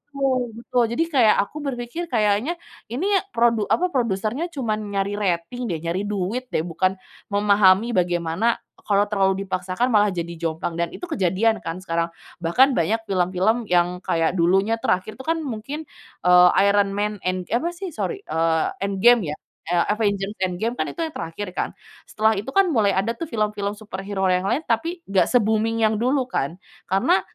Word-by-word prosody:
betul 270 -2 +1 0.2
betul. 245 +1 0
Jadi 330 - +2
kayak 240 -7 +5
aku 205 - -11
berpikir, 265 +3 -4
kayaknya 215 +5 +1 0.4
ini 250 +9 -3 0.3
produ 230 -2 +3
apa 365 +1 +2
produsernya 235 - -1
cuma 235 -7 -1
nyari 200 -1 -2
rating, 200 +6 -2
deh, 170 - -1
nyari 175 +5 -2
duit, 210 +5 -2
deh, - - +2
bukan 185 +3 0 0.4
memahami 200 +1 +4
bagaimana 175 +3 +1 0.3
kalau 200 -1 +3
terlalu 195 -1 +1
dipaksakan 185 +5 -1
malah 210 -2 +5
jadi 170 -1 -4
jomplang 165 0 -3
dan 170 0 0
itu - - -12
kejadian, 210 - +1
kan, 165 +3 -5
sekarang. 170 -2 -1 0.3
Bahkan 250 +12 +4
banyak 210 +7 +1
film-film 190 +5 +1
yang 180 0 +2
kayak 165 0 +1
dulunya 195 +6 +3
terakhir 190 +4 -1
itu, - - -7
kan, 325 0 +1
mungkin, 275 +4 -5 0.4
eee, 180 0 +7 0.2
Iron 200 0 +3
Man 210 +1 -1
End 185 0 -1
apa, 275 +9 +1
sih, 375 +2 -5
sori, 395 +6 -3
eee, 160 0 +1 0.2
Endgame, 200 0 +3
ya, - - -9 0.4
eee, 175 - +3
Avengers 200 -2 -1
Endgame, 185 +5 -1
kan, - - 0
itu 335 - -6
yang 320 - -7
terakhir, 165 +5 -5
kan. - - -2 0.4
Setelah 220 0 +2
itu, 215 +7 -6
kan, 390 0 +6
mulai 205 -5 +3
ada, 215 +5 +1
tuh, 330 - -4
film-film 210 -2 -1
superhero 195 -2 -4
yang 180 +1 +1
lain, 275 +7 0
tapi 330 +10 -1
nggak 195 -1 +2
se-booming 220 +1 +1
yang 215 0 +2
dulu, 260 +2 +2
kan. 160 - -2 0.3
Karena 195 0 +3
205 Hz, 170 wpm, -23 LUFS, 185-235 Hz, 0.4 s, eee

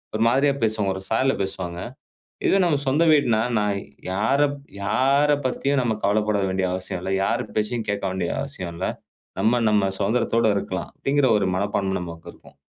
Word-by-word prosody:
ஒரு 110 - +1
மாதிரியா 140 +3 +3
பேசுவாங்க, 105 -3 +1
ஒரு 95 - -7
சாயல்ல 130 +4 +2
பேசுவாங்க. 90 -2 -5 0.7
இதுவே 195 - +4
நம்ம 160 -4 +2
சொந்த 145 +5 +3
வீடுன்னா, 120 -8 +3 0.2
நான் 105 -1 0 0.3
யாரப் 140 +9 +1 0.3
யார 140 +7 +3
பத்தியும் 135 +2 +1
நம்ம 115 -3 0
கவலப்பட 105 +1 +1
வேண்டிய 95 0 0
அவசியம் 90 -1 -4
இல்ல, 95 - -2
யார் - - 0
பேச்சையும் 110 +1 -1
கேக்க 100 -1 -2
வேண்டிய 90 -2 -2
அவசியம் 95 -12 -5
இல்ல, 90 +3 -2 0.5
நம்ம 120 +2 +3
நம்ம 100 -2 +2
சுதந்திரத்தோட 115 +2 +1
இருக்கலாம், 95 -1 -4
அப்டிங்குற 140 -1 +1
ஒரு 100 - 0
மனப்பான்மை 95 0 -1
நமக்கு 85 -1 -8
இருக்கும். 70 0 -19
110 Hz, 160 wpm, -23 LUFS, 95-130 Hz, 0.7 s, இதுவே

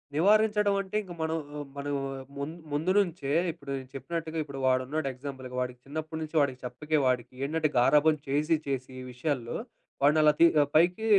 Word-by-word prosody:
నివారించడం 210 +3 +4
అంటే 195 +1 -8
ఇంక 180 -3 -9
మనం 160 +1 0 0.4
మనం 145 0 -3 0.4
ముం 140 +2 -3 0.2
ముందు 155 +5 +1
నుంచే 165 -7 -1 0.2
ఇప్పుడు 150 - -13
నేను 130 -1 -9
చెప్పినట్టుగా 160 +4 -4
ఇప్పుడు 140 -2 -8
వాడున్నడు 130 +3 +1
ఎగ్జాంపుల్‌గా 130 -1 -7
వాడికి 125 -1 -4
చిన్నప్పటి 155 +2 -5
నుంచి 155 +1 -6
వాడికి 130 -3 0
చెప్పకే 150 +5 -1
వాడికి 125 -1 0
ఏంటంటే 155 +1 0
గారాభం 150 +5 +5
చేసి 150 +4 +2
చేసి 135 -2 -2
ఈ - - -7
విషయాల్లో 125 -1 -2 0.5
వాన్ని 150 +2 +5
అలా 150 0 +7
తీ 170 - +8 0.3
పైకి 180 +7 +4
150 Hz, 160 wpm, -29 LUFS, 135-160 Hz, 0.5 s, తీ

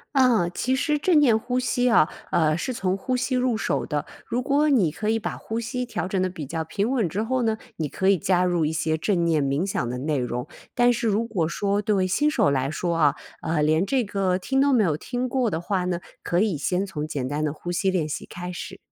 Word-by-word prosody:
啊， 240 -10 +4
其 255 +8 -1
实 300 +2 +1
正 315 +1 +4
念 245 -7 +5
呼 250 +3 -1
吸 250 0 +1
啊， 230 -10 +5 0.2
呃， 155 -1 +2
是 255 - -3
从 190 -4 -1
呼 255 +6 -2
吸 255 +1 -1
入 250 -2 +1
手 160 -10 -1
的。 150 -1 -2 0.2
如 245 - -1
果 290 +3 +2
你 210 - +3
可 210 +7 -4
以 225 +1 +2
把 - - -4
呼 225 +1 -4
吸 250 +2 -3
调 235 - -3
整 190 0 -1
得 185 0 +1
比 160 -6 -7
较 160 +2 -3
平 200 +7 -2
稳 250 -7 +1
之 190 +6 -2
后 250 +2 0
呢， 220 -1 +1 0.2
你 155 - -1
可 190 +6 0
以 195 - +5
加 180 +2 +2
入 175 -3 +1
一 155 - -1
些 160 0 0
正 175 +1 0
念 160 -3 +2
冥 140 +5 0
想 190 -10 -2
的 125 +1 -4
内 150 +1 -1
容， 125 +1 -3 0.3
但 245 0 +4
是 235 0 -1
如 215 +1 +2
果 180 -9 -1
说 200 +4 0
对 205 -3 +2
于 - - +1
新 295 +11 +2
手 220 - +3
来 135 0 0
说 170 +2 -1
啊， 150 -3 +3 0.3
呃， 160 -1 0
连 155 +5 +3
这 260 +3 +1
个 195 -3 0
听 270 +8 0
都 280 0 +4
没 230 -4 +4
有 155 -4 +1
听 250 +5 -3
过 250 -3 +1
的 160 0 -2
话 185 -1 -1
呢， 175 -1 -1 0.2
可 175 - +1
以 200 -5 +1
先 180 +6 0
从 150 -5 -4
简 135 -4 -3
单 145 +2 -2
的 150 - -1
呼 175 +3 -6
吸 190 +2 +1
练 165 -5 -1
习 - - -4
开 180 +1 -7
始。 175 - -7
190 Hz, 275 characters per minute, -24 LUFS, 160-240 Hz, 0.3 s, 念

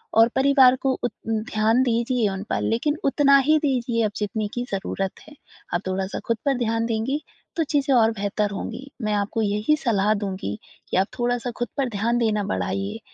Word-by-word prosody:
और 225 +1 +7
परिवार 265 -1 +6
को 270 - +2
उत 245 - 0 0.2
ध्यान 220 +1 +1
दीजिए 235 -1 +1
उन 190 0 -4
पर - - 0
लेकिन 290 +7 0
उतना 280 0 +5
ही 310 0 +6
दीजिए 245 -5 0
अब 210 - -1
जितने 210 +1 -2
की 245 - -1
ज़रूरत 195 0 -2 0.2
है। 300 - -13 0.4
आप 175 - 0
थोड़ा-सा 190 +1 -2
ख़ुद 230 - +1
पर 275 -2 +2
ध्यान 230 -1 0
देंगी 235 +6 -1 0.4
तो 330 - +3
चीज़ें 280 -2 +1
और 225 -2 +5
बेहतर 205 -1 -1
होंगी। 255 +7 -6
मैं 215 0 0
आपको 205 +2 -1
यही 210 +8 +2
सलाह 215 -3 +2
दूँगी 190 - -4 0.3
कि - - 0
आप 190 +1 +3
थोड़ा-सा 245 0 0
ख़ुद 240 - -1
पर 270 -3 0
ध्यान 225 +2 0
देना 215 -3 +1
बढ़ाइए 95 +2 -2
225 Hz, 185 wpm, -23 LUFS, 205-255 Hz, 0.4 s, और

